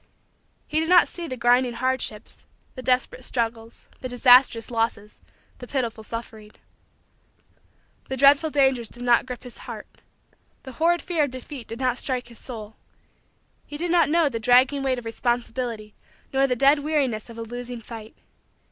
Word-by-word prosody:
He 310 - 0
did 320 +1 -1
not 360 -1 +6
see 345 -1 -5
the 255 - -5
grinding 245 +1 +3
hardships, 250 -3 -3 0.3
the 255 - -8
desperate 255 0 0
struggles, 230 -2 -3
the 255 - -6
disastrous 245 -2 +5
losses, 225 -2 -2 0.4
the 245 - -9
pitiful 235 -5 -3
suffering. 220 -1 -8 1.6
The 265 - -3
dreadful 280 +4 +5
dangers 265 -5 +2
did 240 - -10
not 245 +1 +3
grip 250 0 -7
his 245 -2 -11
heart. - - -7 0.8
The 265 - -9
horrid 335 +5 +1
fear 330 -4 +1
of - - -6
defeat 255 -1 -9
did 230 - -7
not 255 -1 0
strike 255 -2 -3
his 235 - -13
soul. 220 -4 -9 0.9
He 290 - -7
did 340 +2 -2
not 345 -3 +4
know 330 0 +3
the 235 -5 -3
dragging 250 +4 +4
weight 265 -1 0
of 245 - -8
responsibility 230 -2 -3 0.4
nor 270 0 +3
the 250 - 0
dead 275 +4 +4
weariness 280 -7 -1
of 230 - -11
a 230 - -4
losing 245 +1 -7
fight. 225 -1 -10
250 Hz, 165 wpm, -24 LUFS, 230-275 Hz, 1.6 s, not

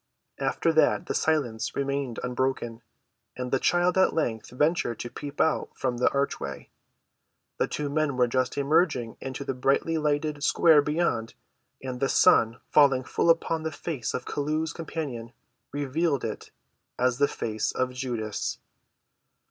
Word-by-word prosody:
After 165 - +1
that 160 - +3
the - - -2
silence 135 -8 0
remained 140 -3 -2
unbroken, 125 -2 -2 0.6
and 125 -1 -4
the 135 - +2
child 175 +1 +2
at 190 - +3
length 115 -9 -1
ventured 150 -1 0
to 120 - -6
peep 145 +2 -8
out 160 - +2
from 125 -2 -1
the 125 - +3
archway. 140 - -3 0.9
The - - +2
two 150 - -3
men 145 -2 0
were 125 - +5
just 130 +1 -1
emerging 140 -5 +1
into 135 +1 -5
the 135 - -1
brightly‐ 140 +5 +1
lighted 150 0 -1
square 155 0 +5
beyond, 145 -7 -1 0.5
and 130 -1 -5
the 135 - +1
sun 115 0 +4
falling 135 -3 +5
full 170 - 0
upon 165 -1 +2
the 160 0 -3
face 145 -5 -4
of - - -4
Chelluh's 155 +2 -2
companion 140 -8 -5 0.4
revealed 145 +1 0
it 110 - -5 0.5
as 125 0 +1
the 145 - +5
face 110 -5 -2
of 130 0 -1
Judas. 120 -5 -3
140 Hz, 150 wpm, -27 LUFS, 125-155 Hz, 0.9 s, were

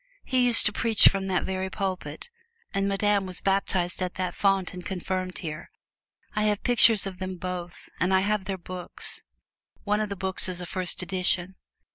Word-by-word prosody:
He 255 -1 +1
used 235 -2 +6
to 210 - +3
preach 225 -2 +5
from 195 -1 -3
that 185 -1 0
very 190 0 -3
pulpit, 190 - -5 0.4
and 195 0 0
Madame 200 0 +1
was 185 -1 0
baptized 190 -2 0
at 180 -1 -3
that 180 -1 -3
font 195 -2 0
and 180 0 -8
confirmed 185 0 -4
here. 155 -2 -6 0.7
I 210 0 +1
have 210 -1 0
pictures 230 -4 +5
of 190 -2 -7
them 185 0 -4
both; 180 -1 -7
and 180 - +1
I 190 0 +4
have 205 0 -1
their 190 0 -3
books 180 0 -2 0.6
one 210 0 0
of 215 -1 -2
the 200 - -4
books 190 0 +2
is 180 -1 -3
a 180 - -5
first 180 0 -1
edition. 180 0 +1
190 Hz, 185 wpm, -26 LUFS, 180-200 Hz, 0.7 s, used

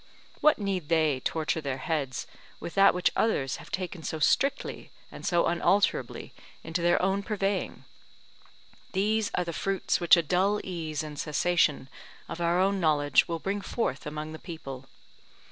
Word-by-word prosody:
What 305 - +5
need 195 -6 -3
they 155 -5 +2
torture 160 +3 -1
their 135 -3 -3
heads 140 -3 -2 0.3
with 170 - -7
that 195 -1 +5
which 180 0 +2
others 140 - +1
have - - -12
taken 185 -2 -4
so 160 +1 -4
strictly 275 - 0 0.2
and - - -10
so 175 -1 +2
unalterably 190 +4 +1 0.3
into 165 +2 -3
their 175 +1 +3
own 195 +2 +1
purveying? 200 -1 -2 1.1
These 210 +2 +1
are 180 - +1
the 170 - -4
fruits 195 +3 -1
which 175 -1 +6
a 170 - +2
dull 190 +6 +1
ease 160 -4 -4
and 150 -2 -7
cessation 155 -3 +1 0.4
of 175 - -6
our 180 +3 +3
knowledge 150 -7 +3
will 170 - -2
bring 195 +5 -3
forth 155 - -3
among 155 +1 -5
the 160 - -8
people. 135 -6 -8
170 Hz, 155 wpm, -28 LUFS, 155-195 Hz, 1.1 s, which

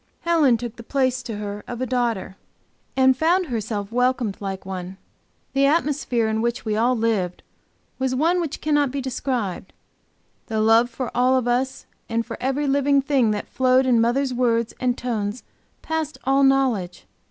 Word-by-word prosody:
Helen 315 -8 +3
took 240 -1 -7
the - - -8
place 255 0 0
to 230 -4 -6
her 205 0 -5
of 240 -1 -6
a 255 - -1
daughter, 235 -6 -1 0.6
and 260 0 +5
found 345 +6 +2
herself 215 -5 -3
welcomed 250 -3 0
like 195 -2 -5
one. 185 0 -6 0.6
The 275 0 +3
atmosphere 285 -6 +1
in 220 0 0
which 235 +2 -2
we 215 -1 0
all 240 +3 +2
lived 215 -6 -1 0.6
was 260 -1 0
one 335 +6 +2
which 315 -4 -4
cannot 295 -2 +2
be 275 +2 -3
described; 245 -8 -3 0.7
the 220 -1 -2
love 225 +2 +4
for 245 +1 -5
all 255 +1 +3
of 250 -2 -1
us 255 +2 -1 0.2
and 230 0 -1
for - - -6
every 270 +3 0
living 280 0 +3
thing 265 -5 +2
that 210 -1 -2
flowed 260 0 +3
in 240 -3 +4
mother's 255 +3 +1
words 235 -2 +1
and 250 -1 0
tones 220 -2 -3 0.4
passed 315 -3 -3
all 270 +1 +3
knowledge. 260 -10 +1
250 Hz, 170 wpm, -23 LUFS, 225-270 Hz, 0.7 s, and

